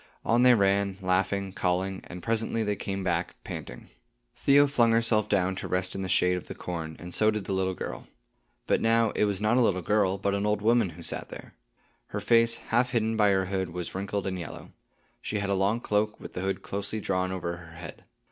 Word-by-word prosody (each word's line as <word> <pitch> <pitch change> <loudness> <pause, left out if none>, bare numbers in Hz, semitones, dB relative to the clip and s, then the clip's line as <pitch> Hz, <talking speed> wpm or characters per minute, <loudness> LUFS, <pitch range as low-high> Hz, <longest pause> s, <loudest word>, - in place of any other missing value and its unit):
On 120 +1 +3
they 125 -1 +7
ran, 100 -1 +2
laughing, 95 +1 0
calling, 95 0 -1
and 90 -1 -9
presently 115 0 0
they 105 -1 0
came 95 0 -4
back, 85 -1 -1
panting. - - -8 0.5
Theo 140 +1 +5
flung 120 -5 +3
herself 115 -2 +2
down 95 -2 +1
to - - -4
rest 90 0 -1
in 95 - -4
the 95 - -3
shade 90 0 +3
of 90 - -8
the - - -7
corn, 80 -3 -5
and 85 +2 -9
so 110 - +4
did 105 -3 -2
the 95 - -2
little 95 -1 0
girl. - - -6 0.6
But - - +1
now, 115 -1 +3
it - - +1
was 100 -2 -1
not 110 +4 +2
a - - +5
little 95 -6 +2
girl, 100 0 +2
but 100 +1 -1
an 100 +1 0
old 105 0 0
woman 115 -3 +3
who 85 +1 -11
sat - - -4
there. - - -10 0.5
Her 105 - -4
face, 115 +2 +4
half 120 +2 0
hidden 115 -2 0
by 105 -2 +4
her 95 -1 +2
hood, 95 -1 -2
was 90 0 -5
wrinkled 100 +1 -3
and 95 -1 -2
yellow. 85 - -8 0.5
She 105 - -3
had 100 -1 -1
a - - +3
long 100 +4 +1
cloak, 105 -2 0
with - - -10
the 90 - -4
hood 95 0 -2
closely 100 +2 -3
drawn 95 -2 -1
over 85 -2 -3
her 85 -2 -13
head. 85 +1 -9
100 Hz, 225 wpm, -28 LUFS, 95-110 Hz, 0.6 s, they